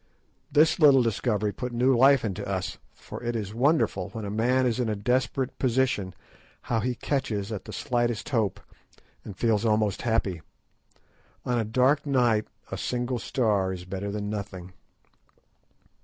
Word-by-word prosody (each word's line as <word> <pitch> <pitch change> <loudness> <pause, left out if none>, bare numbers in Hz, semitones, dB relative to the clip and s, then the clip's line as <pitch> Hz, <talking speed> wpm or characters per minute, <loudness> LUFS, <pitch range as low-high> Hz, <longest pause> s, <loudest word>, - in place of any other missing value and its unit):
This 155 +4 +4
little 140 -5 +7
discovery 105 -2 0
put 125 +5 -5
new 125 +2 +3
life 135 0 +5
into 95 -4 -3
us; - - -3 0.2
for - - -9
it 120 0 -2
is 105 -2 -4
wonderful, 125 - +1
when 110 -2 -6
a 100 - -4
man 125 +4 +2
is 120 -1 0
in 120 -3 0
a 105 - 0
desperate 125 +4 -1
position, 125 -7 0 0.5
how 115 - 0
he 125 +3 -1
catches 115 -7 -2
at 105 - -5
the - - -8
slightest 120 -3 -1
hope, 110 -7 0 0.6
and 100 -3 -9
feels 110 -3 +1
almost 105 -3 +1
happy. 110 -7 0 1.0
On 125 -1 +1
a - - +1
dark 130 +7 +2
night 120 -6 +2 0.2
a - - -4
single 125 0 -2
star 105 -6 0
is 90 -1 -6
better 95 +2 -4
than 105 0 -4
nothing. 100 -3 -6
115 Hz, 155 wpm, -26 LUFS, 105-125 Hz, 1.0 s, little